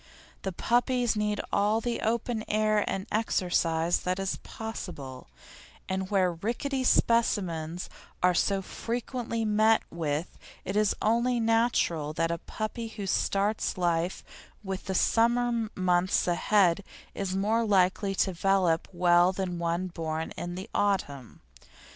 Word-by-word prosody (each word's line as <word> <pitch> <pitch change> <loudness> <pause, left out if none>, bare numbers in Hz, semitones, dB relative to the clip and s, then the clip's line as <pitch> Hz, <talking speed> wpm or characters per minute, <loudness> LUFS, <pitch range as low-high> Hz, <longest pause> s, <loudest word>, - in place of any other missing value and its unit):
The 190 - -3
puppies 240 +4 +1
need 210 0 0
all 210 +2 +2
the 235 +1 -2
open 230 0 -1
air 215 0 +2
and 190 0 -2
exercise 175 -6 +1
that 180 0 -2
is 195 0 -2
possible, 160 - -7 0.6
and 190 0 -2
where 185 -3 +2
rickety 240 +9 -2
specimens 180 -9 +1 0.4
are 180 0 +5
so 195 +2 +1
frequently 235 +1 -3
met 215 +1 +3
with 160 -1 -3 0.3
it 190 - -3
is 210 -1 +2
only 235 +3 +2
natural 225 -10 +1
that 165 +1 0
a 170 - -2
puppy 225 +4 -5
who 215 -2 -6
starts 200 +2 0
life 175 0 0 0.4
with 190 -1 -5
the 190 - -3
summer 235 +1 +2
months 180 0 +2
ahead 185 +1 +3 0.3
is 190 -1 -3
more 215 +4 +1
likely 195 -1 +2
to 190 - +1
develop 180 -2 +1
well 175 0 +4
than 180 -2 -3
one 170 +2 -1
born 160 -3 -4
in 175 0 -5
the 190 +3 -6
autumn. 145 - -1
195 Hz, 130 wpm, -28 LUFS, 175-220 Hz, 0.6 s, are